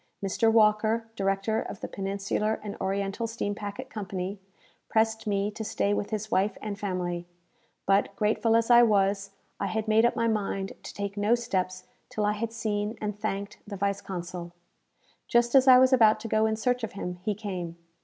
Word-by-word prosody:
Mr. 225 +3 +2
Walker, 220 +1 +3
director 195 +2 0
of - - -7
the - - -3
Peninsular 200 +2 -2
and 205 -1 -5
Oriental 195 +3 -1
Steam 225 -2 -3
Packet 205 +6 -7
Company, 195 -1 -4 0.5
pressed 220 0 +1
me 200 0 0
to 220 +1 -6
stay 205 -1 0
with 205 - -2
his 215 0 -4
wife 200 +3 +1
and 205 -2 -5
family; 175 -3 -3 0.6
but, 195 0 +2
grateful 220 +2 +2
as 230 +1 +3
I 240 0 +9
was, 200 -3 +2 0.3
I - - -1
had 220 0 -2
made 220 +1 +4
up 240 - +3
my 230 - +1
mind 195 -3 -1
to - - -9
take 200 0 -4
no 210 +3 +3
steps 185 -6 -2 0.3
till 210 - -1
I 210 - +2
had 225 +2 -3
seen 215 -1 -2
and 210 -1 -3
thanked 205 -1 -4
the 205 -1 -6
vice 200 +1 -1
consul. 175 -2 -6 0.7
Just 240 0 +3
as 270 -1 +6
I 255 -1 +10
was 260 +1 +5
about 220 -4 +6
to 225 - -5
go 220 0 +2
in 220 - 0
search 250 +2 0
of 225 - -4
him, 180 -2 -5
he 210 +2 -1
came. 180 -5 -5
210 Hz, 190 wpm, -28 LUFS, 195-225 Hz, 0.7 s, I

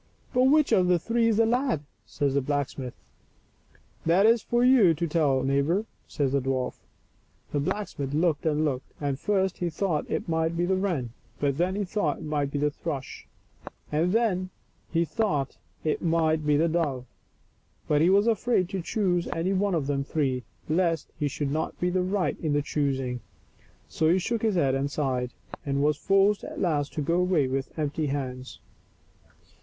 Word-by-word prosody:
" - - -33
But 250 0 +4
which 300 +1 +4
of 185 -5 +4
the 180 0 +4
three 230 +6 +1
is 220 -2 +2
the 225 - +5
lad?" 245 - +1 0.3
says 140 -3 -1
the 140 - +2
blacksmith. 135 -2 -3 0.6
" - - -33
That 180 +5 +5
is 230 0 +5
for 240 +2 +1
you 240 -10 +6
to 170 +3 -1
tell, 145 -5 +2
neighbor," 140 +10 +1 0.2
says 140 -3 -1
the 140 0 +1
dwarf. 130 -1 -2 0.7
The 145 - 0
blacksmith 145 -4 -3
looked 155 0 +1
and 155 0 +1
looked, 135 -3 -3
and 140 -2 -2
first 190 -1 0
he 175 - 0
thought 165 -1 -1
it - - -2
might 160 0 0
be 175 - +1
the 190 +1 +1
wren, 175 - -1 0.3
and 140 -2 +1
then 180 +3 +1
he 205 0 -1
thought 175 -6 -1
it - - -10
might 150 -2 -1
be 145 - -3
the 150 +1 +1
thrush, 140 -3 -6 0.6
and 160 +4 +1
then 195 -5 +1 0.4
he 170 0 +2
thought 180 - -1 0.3
it 155 - 0
might 160 -2 +1
be 145 -1 +4
the 165 +3 +3
dove. 150 -7 -1 0.8
But 150 0 +3
he 170 - +5
was 200 +2 +4
afraid 225 -4 +1
to 190 -1 -3
choose 180 -2 0
any 175 +4 -1
one 195 -1 +1
of 155 -4 0
the 140 -1 -1
three, 135 -3 -1 0.3
lest 165 0 0
he 150 - +1
should 140 0 -3
not 155 +2 -2
be 180 0 +1
right 185 +1 0
in 155 -3 -1
the 145 0 +1
choosing. 135 -4 -1 0.7
So 160 - +1
he 180 - +4
shook 225 +4 -1
his 220 -3 +1
head 140 -6 +2
and 135 +1 0
sighed, 130 -4 -1 0.3
and 140 0 0
was 150 0 +3
forced 195 +5 +2
at - - -7
last 150 -5 0
to 150 - -2
go 170 +5 +1
away 180 -6 +2
with 135 +3 -3
empty 150 0 -1
hands. 130 -2 -4
160 Hz, 190 wpm, -27 LUFS, 140-190 Hz, 0.8 s, you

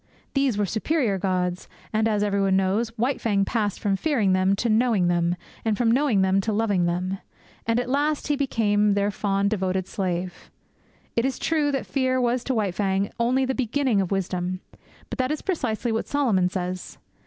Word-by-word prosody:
These 275 -6 +1
were 205 - +2
superior 220 - 0
gods; 180 -1 -1 0.2
and, 220 +1 +2
as 210 -2 +1
everybody 200 -2 +2
knows, 195 +5 +1
White 250 +4 0
Fang 200 -3 +1
passed 210 -3 -1
from 200 -2 +1
fearing 220 -6 +1
them 185 +1 +3
to 235 - -1
knowing 220 -5 +3
them, 175 0 +1 0.3
and 220 -2 0
from 235 -2 +2
knowing 245 -6 +3
them 190 +1 +3
to 220 - -2
loving 205 -4 +1
them. 180 +2 -2 0.5
And 230 +1 +2
at 245 - -2
last 290 +3 0
he 295 - +2
became 210 -7 +2
their 200 0 +1
fond, 200 0 0
devoted 190 -3 0
slave. 185 -3 -3 0.7
It 230 - +2
is 265 0 -1
true 305 -3 +1
that 270 - -1
fear 260 -2 0
was 245 0 +1
to 260 - 0
White 205 -5 0
Fang 195 +1 0
only 255 +3 +2
the 265 - -1
beginning 255 -3 +1
of 185 - -2
wisdom; 185 -1 -2 0.5
but - - -5
that 255 0 +1
is 305 - -3
precisely 245 - -1
what 225 - -1
Solomon 220 -11 +2
says. 180 -1 -4
210 Hz, 190 wpm, -24 LUFS, 190-250 Hz, 0.7 s, them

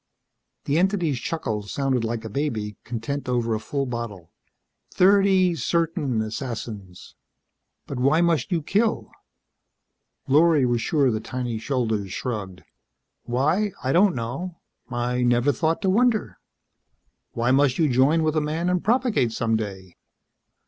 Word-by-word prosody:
The 145 +3 +1
entity's 175 -8 +1
chuckle 115 -9 -3
sounded 130 +3 -1
like 115 0 -3
a - - -5
baby, 110 -7 -2
content 125 +4 -4
over 120 -2 0
a 110 - -1
full 140 +4 -3
bottle. 115 -9 -6 0.6
"Thirty 190 -1 +4
certain 165 -8 0
assassins." 110 -5 -7 0.7
"But 135 - -5
why 140 +5 +3
must 170 -3 +1
you 165 -3 0
kill?" 215 +7 0 1.2
Lorry 150 0 +4
was 120 -1 +1
sure 140 -1 +2
the 110 - -1
tiny 120 0 -4
shoulders 110 -6 -1
shrugged. 100 -7 -5 0.6
"Why? 155 - +1
I 130 - 0
don't 185 +3 +4
know. 135 +10 -5 0.3
I 125 0 -1
never 120 +3 +3
thought 160 +4 -1
to 190 - +2
wonder. 230 0 +1 0.9
Why 120 +2 +1
must 135 -1 +3
you 160 - +3
join 140 +5 +3
with 155 0 0
a 155 - +2
man 160 +4 -1
and 180 -1 0
propagate 230 - +2
some 115 0 0
day? 95 -4 -5
130 Hz, 135 wpm, -24 LUFS, 115-165 Hz, 1.2 s, Thirty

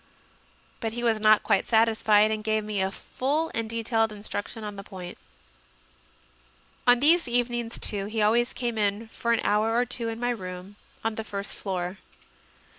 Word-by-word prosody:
But 225 -2 -3
he 240 +1 -4
was 225 -2 +2
not 215 0 +5
quite - - +2
satisfied, 220 -2 +4
and 215 -1 -2
gave 215 0 0
me 210 -2 -2
a 190 - +1
full 290 +10 -2
and 230 -1 -2
detailed 225 -1 +1
instruction 210 +1 -6
on 210 -1 -5
the 195 - -7
point. 180 -2 -8 1.7
On 245 0 +7
these 325 +3 +5
evenings, 240 -1 0
too, 200 -2 -1
he 220 +1 -3
always 230 +4 +3
came 235 -3 -3
in 205 +2 -1
for 235 +1 -2
an 230 - +2
hour 215 +2 +2
or 245 - +3
two 235 -1 -1
in 225 0 -5
my 245 0 0
room, 185 -2 -7 0.3
on 225 - 0
the - - -8
first 200 -2 -5
floor. 185 -1 -4
220 Hz, 175 wpm, -26 LUFS, 205-235 Hz, 1.7 s, On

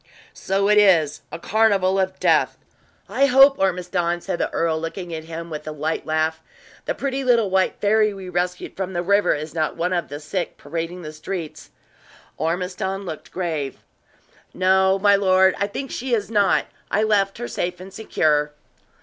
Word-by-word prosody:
"So 195 +1 0
it 210 0 +5
is 160 -7 +4
a - - -5
carnival 195 -1 +2
of 190 0 -1
death! - - +2 0.5
I 275 - +2
hope, 275 +1 +6
Ormiston," 175 -2 0
said 170 - -4
the - - 0
earl, 160 -1 0
looking 170 +1 -5
at 160 0 -6
him 165 +1 -7
with 150 0 -6
a - - -3
light 155 +2 -3
laugh, 160 0 0 0.4
"the - - -2
pretty 275 -1 -2
little 235 -6 +3
white 190 0 +2
fairy 215 +1 +3
we 195 -2 -9
rescued 180 0 -3
from 190 -1 -4
the 175 0 -1
river 200 +3 +3
is 155 +1 -6
not 155 -2 -1
one 175 +2 0
of 175 -1 -1
the 145 - -6
sick 170 +3 -4
parading 165 +4 -5
the 155 0 -7
streets." 160 +1 -6 0.7
Ormiston 180 +4 -2
looked 160 -4 -7
grave. 160 -7 -3 0.8
"No, 190 +1 +3
my 200 +1 +4
lord, 190 -1 +4
I 200 - +1
think 270 +6 -6
she 250 -1 -1
is 215 0 -4
not. 205 -3 +3 0.2
I 210 - +1
left 200 -2 +1
her 240 +1 -5
safe 180 0 -3
and 190 +1 -11
secure." 150 -8 0
185 Hz, 175 wpm, -22 LUFS, 165-200 Hz, 0.8 s, hope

